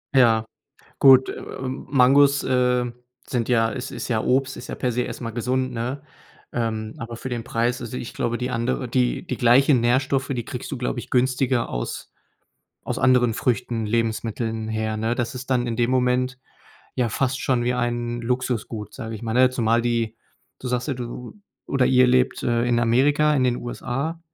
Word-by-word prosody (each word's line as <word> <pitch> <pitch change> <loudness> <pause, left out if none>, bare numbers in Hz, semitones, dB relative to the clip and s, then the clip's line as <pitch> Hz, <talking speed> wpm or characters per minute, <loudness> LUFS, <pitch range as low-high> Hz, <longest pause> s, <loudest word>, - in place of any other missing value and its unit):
Ja. 115 -4 +5 0.5
Gut, 130 -1 +7
äh, - - -6 0.2
Mangos, 135 +1 +3
äh, 125 -1 +1 0.4
sind 120 -2 -2
ja 115 -2 +3
is 125 +4 -5
ist - - -5
ja 110 -3 0
Obst, 130 +1 +1
ist 120 - -9
ja - - -4
per 125 - -1
se 125 - 0
erst 125 - -5
mal 115 - -4
gesund, 130 +2 -1
ne? 125 +4 -4 0.5
Ähm, 110 -2 -2
aber 115 -2 -6
für 125 +3 -6
den 120 -2 -3
Preis 120 0 -1
also, 120 +1 -5
ich 120 - -6
glaube 120 0 -1
die 125 +1 -3
andere 115 - -1
die - - 0
die - - -4
gleichen 125 +2 +5
Nährstoffe, 130 +2 +1
die 120 -4 -2
kriegst 125 - -6
du, 135 - -3
glaube 125 0 -2
ich, - - -10
günstiger 130 -1 +1
aus - - -5 0.7
aus - - -3
anderen 125 -2 +4
Früchten, 115 -1 -1
Lebensmitteln 115 0 -2
her, 110 0 -2
ne? 115 +2 0
Das 120 -1 -2
ist 125 +1 -7
dann 125 -1 +2
in 115 - -2
dem 120 +1 +1
Moment 125 0 +1 0.6
ja 120 -2 +1
fast 130 +3 -1
schon 125 -2 +1
wie 125 +1 +1
ein 120 -1 -2
Luxusgut, 115 -4 -2
sage 110 0 -6
ich 110 - -8
mal, 115 -1 -3
ne? 130 +1 +6
Zumal 115 -2 +2
die 115 -1 -1 0.4
du 130 - -6
sagst 125 +3 -1
ja, 140 - 0
du 120 0 -7 0.3
oder 130 -2 +2
ihr 130 -1 +5
lebt, 125 +1 +2
äh, 120 0 +1
in 120 -1 +2
Amerika, 145 +6 +3
in 135 - +2
den 125 -1 +2
USA. 135 +7 -4
125 Hz, 190 wpm, -23 LUFS, 115-130 Hz, 0.7 s, Gut